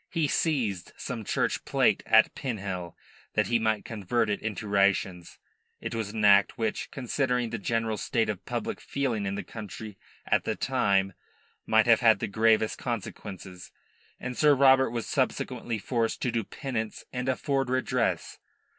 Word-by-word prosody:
He 165 -4 0
seized 120 - 0
some 120 -4 -5
church - - -1
plate - - +2
at 110 0 +5
Pinhel 95 -8 -4 0.4
that - - +3
he 120 -1 +1
might 110 -1 0
convert 110 +1 -1
it 100 - -2
into 105 -1 -4
rations. 100 -3 +1 0.4
It - - -5
was 110 -3 -2
an 110 0 -1
act 100 +4 +5
which, 110 -2 -2
considering 125 -2 -1
the 115 - -3
general 115 +1 -1
state 115 +2 0
of 100 -3 -4
public - - -4
feeling 120 -8 -2
in 95 - -2
the - - -4
country 105 -1 -8 0.3
at - - +2
the - - -1
time, 95 -1 +1 0.5
might - - +4
have - - +5
had - - +5
the - - -2
gravest 110 +1 +2
consequences, 95 -5 -6 0.5
and 125 0 -5
Sir 150 +1 +5
Robert 135 0 +5
was 115 0 -3
subsequently 115 -2 -1
forced 115 +1 -1
to 125 - +1
do 115 -1 -1
penance 110 -1 -4
and 125 +1 -2
afford 135 0 0
redress. 130 0 -1
110 Hz, 160 wpm, -28 LUFS, 100-125 Hz, 0.5 s, at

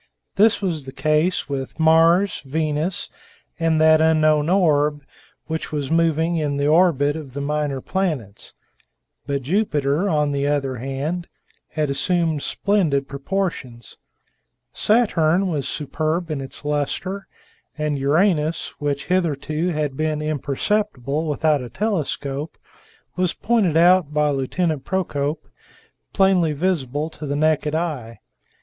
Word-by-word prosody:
This 215 +1 +3
was 160 -7 -2
the - - -6
case 155 +5 +1
with 135 +2 -5
Mars, 165 +4 +4
Venus, 155 +4 -2 0.5
and 165 -1 +2
that 155 0 +5
unknown 155 -1 +3
orb 150 -5 +2 0.4
which 160 0 -4
was 145 -1 -3
moving 165 0 +2
in 145 -3 -1
the 140 - 0
orbit 150 -3 +3
of 150 -5 -8
the 140 - -4
minor 145 -1 -2
planets; 150 - -3 0.7
but 140 -1 -2
Jupiter, 150 - 0
on 150 -3 +1
the 140 0 0
other 135 -3 -1
hand, 140 +8 -3 0.5
had 150 -2 0
assumed 165 0 0
splendid 160 -10 0
proportions; 140 -5 -4 0.7
Saturn 195 -5 +2
was 145 -6 -2
superb 155 +3 -2
in 145 -3 -2
its 135 +2 -9
luster, 150 +7 -2 0.5
and 150 -2 -1
Uranus, 155 +2 +1
which 145 -1 -2
hitherto 165 -2 0
had 150 -5 -1
been 155 +1 -1
imperceptible 150 - -1
without 150 -1 +1
a 125 - -7
telescope 150 - -3 0.6
was 180 -1 0
pointed 210 -9 +1
out 175 -2 +5
by 150 0 +2
Lieutenant 145 +3 -1
Procope, 155 -5 -2 0.6
plainly 190 -5 +3
visible 150 -2 -1
to 150 -1 -8
the 140 - -1
naked 155 0 +1
eye. 145 -9 -3
155 Hz, 125 wpm, -22 LUFS, 145-170 Hz, 0.7 s, that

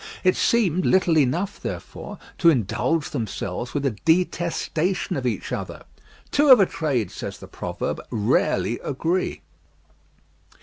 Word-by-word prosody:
It 185 -1 +4
seemed 185 -7 +2
little 185 -3 +3
enough, 160 +8 +1
therefore, - - -6 0.2
to 170 - +6
indulge 150 - 0
themselves 115 - -4
with 145 -1 0
a 135 - +2
detestation 170 - 0
of 130 -3 -1
each 110 -6 -3
other. - - -5 0.5
Two 290 0 +3
of 255 -3 +10
a 195 - +6
trade, 135 - -1
says - - -6
the - - -11
proverb, - - -4
rarely 105 -2 +1
agree. 165 +6 -2
160 Hz, 130 wpm, -23 LUFS, 125-185 Hz, 0.5 s, of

